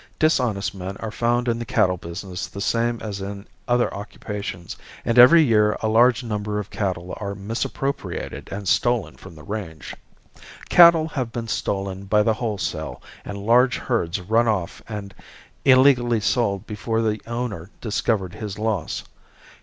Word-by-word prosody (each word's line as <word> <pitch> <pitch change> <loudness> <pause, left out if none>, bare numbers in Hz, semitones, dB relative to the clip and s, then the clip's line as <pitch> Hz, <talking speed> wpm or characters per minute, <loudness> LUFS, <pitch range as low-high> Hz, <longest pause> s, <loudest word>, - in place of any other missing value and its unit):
Dishonest 125 -10 +1
men 95 0 -6
are 110 - -5
found 120 +2 0
in 115 -1 0
the - - -3
cattle 90 -4 +2
business 90 +2 -6
the 100 - -9
same 115 +3 0
as 100 -3 -5
in 100 +1 -6 0.2
other 120 0 +2
occupations 100 -3 -6 0.3
and 115 +1 +3
every 160 +7 +9
year 105 -5 +3
a 110 - -1
large 120 +3 +4
number 105 -2 -3
of 105 -1 -5
cattle 90 -3 -3
are 100 -1 -3
misappropriated 115 +7 -4
and 100 0 -5
stolen 120 +1 +1
from 95 -3 -13
the 75 - -13
range. 80 -5 -6 0.7
Cattle 170 -2 +7
have 130 -6 -3
been 115 -1 -5
stolen 100 -3 -3
by 105 +2 +3
the 110 - +2
wholesale 110 -3 -3 0.2
and 100 - -6
large 120 +2 +4
herds 100 -7 -1
run 110 +6 +2
off 95 -6 -1
and 100 -2 -6 0.5
illegally 130 -3 +5
sold 105 -1 0
before 115 +1 -2
the 110 -1 -1
owner 115 -7 -4
discovered 105 -4 -1
his 105 -3 -6
loss. 105 -6 -2
105 Hz, 155 wpm, -23 LUFS, 100-120 Hz, 0.7 s, every